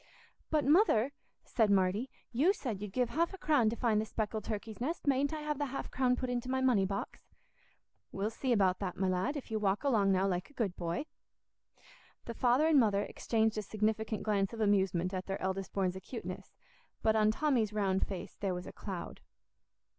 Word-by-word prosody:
"But, 305 -4 +1
Mother," 285 - +4 0.3
said 220 -3 +2
Marty, 200 +5 +2 0.2
"you 290 +11 +3
said 235 - -4
you'd 210 -2 -5
give 245 +2 0
half 335 +9 0
a - - -12
crown 290 -10 +3
to 225 - -3
find 225 -3 +2
the - - -3
speckled 215 0 -3
turkey's 215 +1 -5
nest. 320 +7 -2
Mayn't 280 0 +2
I 310 -1 -4
have 300 -1 -2
the 290 - 0
half 270 +1 -5
crown 250 -1 +2
put 255 - -3
into 245 0 -2
my 260 0 +1
money 240 -7 +3
box?" 200 +1 -4 0.9
"We'll 200 +3 -2
see 255 +3 -2
about 190 -5 +3
that, 185 -3 -4
my 190 - +1
lad, 185 +11 0
if 265 - -8
you 220 - 0
walk 200 +2 0
along 215 -8 +3
now, 190 0 +2
like 180 -1 -2
a - - -20
good 210 -9 -1
boy." 170 - -3 1.2
The 235 - -5
father 250 +5 +3
and 315 -3 +5
mother 205 -4 +3
exchanged 220 -1 0
a - - -1
significant 215 +1 -1
glance 200 -1 0
of 230 - -7
amusement 190 -4 +2
at 185 0 -4
their 195 0 -3
eldest 190 0 -3
born's 190 -2 0
acuteness; 190 -1 -7 0.5
but 220 0 +3
on 215 -1 +4
Tommy's 235 -3 +1
round 195 -3 0
face 190 -3 -6
there 190 -3 -1
was 180 - -6
a - - -7
cloud. 190 -4 -6
215 Hz, 200 wpm, -32 LUFS, 195-255 Hz, 1.2 s, and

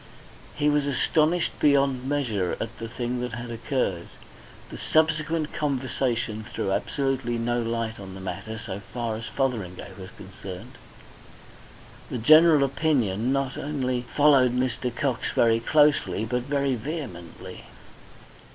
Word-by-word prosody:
He 150 - +1
was 145 -1 +2
astonished 155 +4 +1
beyond 135 -3 +3
measure 115 -11 0
at 115 - -4
the 115 - -4
thing 120 +1 -3
that 125 -2 -4
had 120 +1 -5
occurred. 115 -7 -2 0.6
The - - -7
subsequent 160 0 +1
conversation 130 -6 -1
threw 100 -2 -3
absolutely 130 +1 -1
no 120 +1 0
light 115 -1 -2
on 95 -1 -8
the - - -8
matter 95 +4 -5
so 100 -2 -6
far 115 +2 -4
as 115 +2 -6
Fotheringay 105 -10 -3
was 95 -1 -8
concerned; 100 +5 -10 1.3
the - - -3
general 155 +4 +7
opinion 130 -6 +1
not 135 -1 -1
only 130 -4 -1
followed 130 0 +4
Mr. 125 0 -1
Cox 130 -3 -1
very 115 -1 +4
closely 145 - +3
but 125 +2 -1
very 140 +1 0
vehemently. 125 - -6
125 Hz, 130 wpm, -26 LUFS, 110-140 Hz, 1.3 s, general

